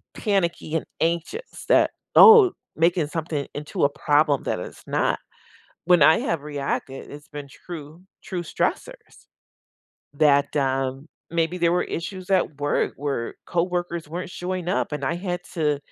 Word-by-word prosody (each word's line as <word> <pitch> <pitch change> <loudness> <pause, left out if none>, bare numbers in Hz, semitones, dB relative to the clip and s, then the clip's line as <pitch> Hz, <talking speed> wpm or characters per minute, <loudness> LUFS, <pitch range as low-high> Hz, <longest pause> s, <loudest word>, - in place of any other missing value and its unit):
panicky 170 -6 -1
and 160 - -1
anxious 170 - -3
that, - - +4 0.2
"Oh, 445 -4 +9 0.2
making 165 -1 +2
something 155 -2 -3
into 150 +1 -3
a 140 - +5
problem 145 -1 +2
that - - -2
it's - - -9
not." - - 0 0.7
When 175 -4 +5
I 160 - +6
have 165 -3 -1
reacted, 140 -2 -4
it's 145 0 -11
been 145 -1 -8
true 160 +3 -10 0.2
true 180 -4 -4
stressors 160 - -4 0.9
that, 140 -1 +3
um 135 +1 -1 0.2
Maybe 170 +1 0
there 170 -1 +3
were 180 - +1
issues 185 +2 -6
at 175 -6 +1
work 145 0 0
where 140 -4 -3
coworkers 175 -2 -2
weren't 180 +3 -5
showing 180 -1 -4
up 190 - 0
and 150 -2 -3
I 155 - 0
had 180 -1 -3
to 150 -3 +1
160 Hz, 145 wpm, -24 LUFS, 145-175 Hz, 0.9 s, Oh